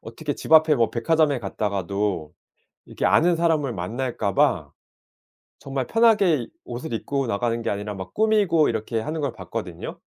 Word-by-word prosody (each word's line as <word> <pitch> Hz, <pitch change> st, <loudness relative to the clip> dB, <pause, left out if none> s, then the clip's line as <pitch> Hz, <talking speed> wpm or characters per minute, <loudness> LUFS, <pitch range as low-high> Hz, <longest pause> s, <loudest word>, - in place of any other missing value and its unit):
어떻게 145 Hz, +7 st, -5 dB
집 -, -, -5 dB
앞에 160 Hz, -1 st, +7 dB
뭐 115 Hz, -3 st, +2 dB
백화점에 145 Hz, +3 st, +2 dB
갔다가도 100 Hz, -5 st, -2 dB, 0.5 s
이렇게 -, -, -2 dB
아는 175 Hz, +1 st, +4 dB
사람을 160 Hz, -6 st, +1 dB
만날까 110 Hz, +2 st, -3 dB
봐 -, -, +2 dB, 0.9 s
정말 135 Hz, -2 st, -4 dB
편하게 205 Hz, -, +3 dB, 0.2 s
옷을 120 Hz, 0 st, -6 dB
입고 135 Hz, +3 st, -2 dB
나가는 115 Hz, +2 st, -1 dB
게 -, -, -1 dB
아니라 105 Hz, +1 st, -4 dB
막 95 Hz, -1 st, -8 dB
꾸미고 210 Hz, -8 st, +3 dB
이렇게 115 Hz, 0 st, -2 dB
하는 155 Hz, +7 st, -4 dB
걸 140 Hz, -, -1 dB
봤거든요. -, -, -7 dB
125 Hz, 340 characters per minute, -23 LUFS, 105-160 Hz, 0.9 s, 앞에